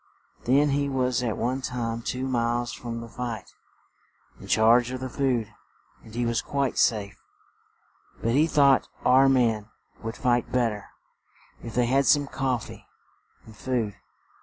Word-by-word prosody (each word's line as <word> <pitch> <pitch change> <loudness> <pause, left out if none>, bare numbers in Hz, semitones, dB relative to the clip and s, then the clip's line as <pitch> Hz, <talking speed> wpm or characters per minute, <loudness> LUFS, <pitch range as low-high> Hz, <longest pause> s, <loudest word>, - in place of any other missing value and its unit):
Then 140 +4 +4
he 140 0 0
was 130 -2 0
at 115 -4 -2
one 125 +4 -1
time 115 -3 -3
two 130 +3 -3
miles 120 -1 -1
from 115 -1 -6
the 115 - -8
fight, 115 -1 -6 0.9
in - - -11
charge 115 +2 +4
of 130 0 -5
the 130 0 -5
food; 125 -6 -1 0.5
he 120 +2 -4
was 115 -1 0
quite 140 -2 -1
safe; 100 -3 +1 1.0
but 115 - -1
he 150 +6 +3
thought 140 -4 +4 0.2
our 130 +2 +6
men 115 -5 +1 0.3
would 115 +1 -5
fight 120 -1 +1
bet 120 -2 +2
ter, 105 -1 -8 0.8
if 115 -2 -8
they 125 0 +3
had 135 +3 +2
some 145 -1 +4
cof 130 -4 -1
fee - - -12 0.6
and 110 - -14
food. 115 -3 -2
120 Hz, 155 wpm, -26 LUFS, 115-130 Hz, 1.0 s, our